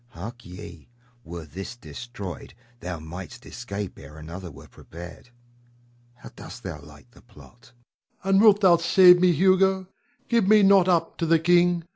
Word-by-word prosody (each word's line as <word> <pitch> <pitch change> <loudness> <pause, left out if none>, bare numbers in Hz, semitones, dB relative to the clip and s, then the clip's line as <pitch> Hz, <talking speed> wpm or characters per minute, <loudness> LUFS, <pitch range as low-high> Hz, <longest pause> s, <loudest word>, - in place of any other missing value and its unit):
Hark 115 +8 -9
ye! 85 -1 -12 0.3
were 85 -1 -9
this 95 +9 -8
destroyed, 120 - -9 0.2
thou 90 -4 -6
might'st 85 +3 -10
escape 100 -1 -7
ere 70 +3 -13
another 85 +4 -9
were 70 -3 -14
prepared. 85 +8 -13 0.9
How 120 - -13
dost - - -11
thou 75 - -7
like 75 0 -17
the - - -20
plot? 120 +2 -19 0.5
Rod. 195 - 0
And 195 - +5
wilt 210 -2 +5
thou 180 -3 +5
save 180 +1 +6
me, 180 -1 +4
Hugo? 190 +3 +2 0.4
Give 230 -5 +1
me 210 0 +5
not 195 -2 +5
up 170 -3 0
to 165 - -1
the 165 +1 +4
king! 175 +1 +2
125 Hz, 160 wpm, -24 LUFS, -, 0.9 s, save